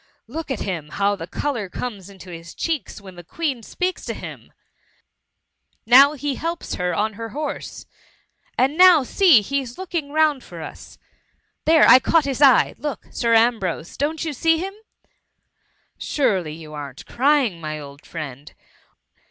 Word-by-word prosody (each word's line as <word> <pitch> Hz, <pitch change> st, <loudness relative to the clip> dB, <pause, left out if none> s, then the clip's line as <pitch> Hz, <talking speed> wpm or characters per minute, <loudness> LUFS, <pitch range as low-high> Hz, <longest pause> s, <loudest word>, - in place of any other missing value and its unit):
Look 310 Hz, +7 st, -7 dB
at 265 Hz, -, -3 dB
him, 165 Hz, -6 st, -4 dB
how 200 Hz, +4 st, 0 dB
the 165 Hz, -4 st, -8 dB
colour 235 Hz, -8 st, -3 dB
comes 200 Hz, -3 st, -6 dB
into 190 Hz, -2 st, -12 dB
his 170 Hz, 0 st, -10 dB
cheeks 310 Hz, -, -3 dB
when 195 Hz, -2 st, -12 dB
the 175 Hz, 0 st, -12 dB
Queen 275 Hz, -, -3 dB
speaks 365 Hz, -, -3 dB
to -, -, -4 dB
him! -, -, -10 dB, 1.3 s
Now 270 Hz, +5 st, +7 dB
he 290 Hz, -1 st, -3 dB
helps 330 Hz, +5 st, -4 dB
her 180 Hz, 0 st, -1 dB
on 215 Hz, +3 st, -1 dB
her 225 Hz, +2 st, -7 dB
horse— 295 Hz, +6 st, -6 dB, 0.7 s
and 280 Hz, +6 st, +1 dB
now 365 Hz, -5 st, +8 dB
see, 330 Hz, -, +5 dB
he^s 260 Hz, +2 st, -3 dB
looking 340 Hz, -6 st, -4 dB
round 305 Hz, -3 st, +2 dB
for -, -, -11 dB
us! -, -, -11 dB, 0.7 s
There 320 Hz, 0 st, +6 dB
I 255 Hz, -, +9 dB
caught 305 Hz, +5 st, +2 dB
his 275 Hz, 0 st, -3 dB
eye 270 Hz, -4 st, +6 dB
— -, -, -37 dB
Look, 295 Hz, +1 st, -5 dB
Sir 230 Hz, -1 st, +1 dB
Ambrose! 220 Hz, -8 st, +1 dB
don't 310 Hz, +3 st, -2 dB
you 310 Hz, -, -3 dB
see 325 Hz, +4 st, +2 dB
him? 380 Hz, +4 st, -4 dB, 0.7 s
— -, -, -45 dB
Surely 190 Hz, -, 0 dB
you 155 Hz, -1 st, -11 dB
am't 140 Hz, -3 st, -8 dB
crpng, 260 Hz, -, +1 dB
my 155 Hz, -1 st, -5 dB
old 140 Hz, 0 st, -11 dB
friend? 145 Hz, -3 st, -8 dB
245 Hz, 160 wpm, -22 LUFS, 185-300 Hz, 1.3 s, I